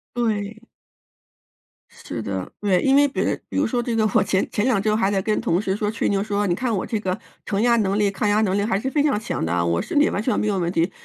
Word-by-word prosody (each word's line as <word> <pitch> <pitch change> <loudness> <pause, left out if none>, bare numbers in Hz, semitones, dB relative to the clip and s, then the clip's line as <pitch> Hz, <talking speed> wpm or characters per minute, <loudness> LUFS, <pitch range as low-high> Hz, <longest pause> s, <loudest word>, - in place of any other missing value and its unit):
对。 220 -2 -2 1.3
是 115 - -7
的， 95 -3 -4
对， 195 -3 +2
因 270 0 +4
为 285 0 +6
别 275 - -1
比 - - -3
如 - - +2
说 240 +1 -1
这 235 -1 -2
个 215 -1 +2
我 - - +5
前 190 - 0
前 210 - -1
2 240 -7 +2
周 215 +1 +1
还 200 -3 +1
在 195 -1 +1
跟 215 +2 0
同 185 -6 +1
事 195 -1 -1
说 210 -1 -1
吹 225 - -1
牛 195 -1 +1
说， 205 -1 -1
你 175 - +1
看 240 +1 -1
我 190 - -2
这 220 - -2
个 185 -1 -2 0.3
承 200 0 -1
压 235 -1 +4
能 200 -2 +1
力、 205 -1 +2
抗 205 +1 -1
压 210 +1 +3
能 195 -2 +1
力 200 - +1
还 205 -2 0
是 265 - -2
非 290 0 +2
常 285 -8 +1
强 220 - -3
的 80 - -2
啊， 85 -1 +1
我 85 0 +1
身 - - -1
体 - - +4
完 205 - -2
全 250 - 0
没 215 - 0
有 200 -2 0
问 170 -1 0
题， 170 +2 +1
205 Hz, 295 characters per minute, -22 LUFS, 190-225 Hz, 1.3 s, 为